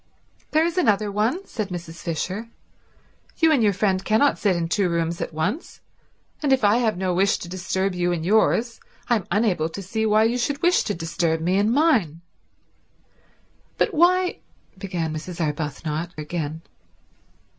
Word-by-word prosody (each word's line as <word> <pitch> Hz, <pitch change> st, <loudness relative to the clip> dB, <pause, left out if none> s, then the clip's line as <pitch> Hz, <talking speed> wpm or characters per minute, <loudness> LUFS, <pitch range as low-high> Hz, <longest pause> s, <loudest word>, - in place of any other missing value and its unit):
"There 315 Hz, +2 st, +3 dB
is 340 Hz, +2 st, 0 dB
another 210 Hz, -, +2 dB
one," 230 Hz, -, 0 dB
said 215 Hz, -, -4 dB
Mrs. 170 Hz, -2 st, -7 dB
Fisher. 185 Hz, +7 st, -3 dB, 0.9 s
"You 325 Hz, -1 st, +4 dB
and 285 Hz, -6 st, +3 dB
your 210 Hz, -2 st, +4 dB
friend 190 Hz, -1 st, 0 dB
cannot 225 Hz, +7 st, +2 dB
sit 200 Hz, -4 st, +2 dB
in 170 Hz, -1 st, -1 dB
two 185 Hz, +1 st, +1 dB
rooms 170 Hz, 0 st, -1 dB
at -, -, -3 dB
once, 185 Hz, -, -3 dB, 0.6 s
and 290 Hz, -3 st, +1 dB
if 265 Hz, -3 st, +3 dB
I 205 Hz, +2 st, +5 dB
have 225 Hz, -5 st, +1 dB
no 185 Hz, -1 st, -1 dB
wish 195 Hz, +3 st, +2 dB
to -, -, -8 dB
disturb 185 Hz, +1 st, -2 dB
you 175 Hz, 0 st, 0 dB
in 170 Hz, -2 st, -2 dB
yours 220 Hz, +4 st, +2 dB, 0.3 s
I 235 Hz, -, +5 dB
am 195 Hz, -, -7 dB
unable 185 Hz, -5 st, +1 dB
to 195 Hz, +4 st, -7 dB
see 220 Hz, +4 st, -1 dB
why 215 Hz, +1 st, +4 dB
you 235 Hz, +2 st, +1 dB
should 285 Hz, +5 st, -2 dB
wish 350 Hz, +1 st, +4 dB
to 205 Hz, -, -2 dB
disturb 165 Hz, 0 st, -1 dB
me 175 Hz, +3 st, 0 dB
in 205 Hz, +2 st, +2 dB
mine." 235 Hz, -, +2 dB, 1.6 s
"But -, -, +1 dB
why—" 360 Hz, +3 st, +3 dB, 0.4 s
began 180 Hz, -5 st, -3 dB
Mrs. 170 Hz, +3 st, -7 dB
Arbuthnot 155 Hz, +2 st, -3 dB
again. 155 Hz, 0 st, -4 dB
190 Hz, 165 wpm, -23 LUFS, 170-230 Hz, 1.6 s, I